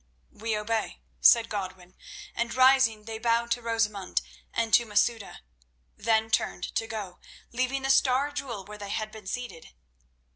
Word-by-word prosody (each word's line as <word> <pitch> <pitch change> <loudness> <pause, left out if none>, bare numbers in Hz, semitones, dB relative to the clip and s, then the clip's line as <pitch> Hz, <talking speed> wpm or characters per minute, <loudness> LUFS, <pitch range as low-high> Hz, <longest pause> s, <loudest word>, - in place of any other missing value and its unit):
"We 220 0 -3
obey," 220 +1 -2 0.2
said 230 -1 +6
Godwin, 185 -3 -6 0.4
and 235 +1 -2
rising 260 -4 +5
they 220 0 -6
bowed 235 0 +1
to 245 - +1
Rosamund 220 -4 -1 0.3
and 230 -1 -1
to 240 - +7
Masouda, 220 0 0 0.5
then 220 0 +1
turned 180 - -1
to 225 - -1
go, 205 -5 -6 0.3
leaving 255 +2 -1
the 270 - +3
star 270 +1 +3
jewel 235 -9 -5
where 210 0 -10
they 200 -1 -7
had 215 +1 -3
been 215 -3 -12
seated. 215 - -6
225 Hz, 150 wpm, -27 LUFS, 210-240 Hz, 0.5 s, to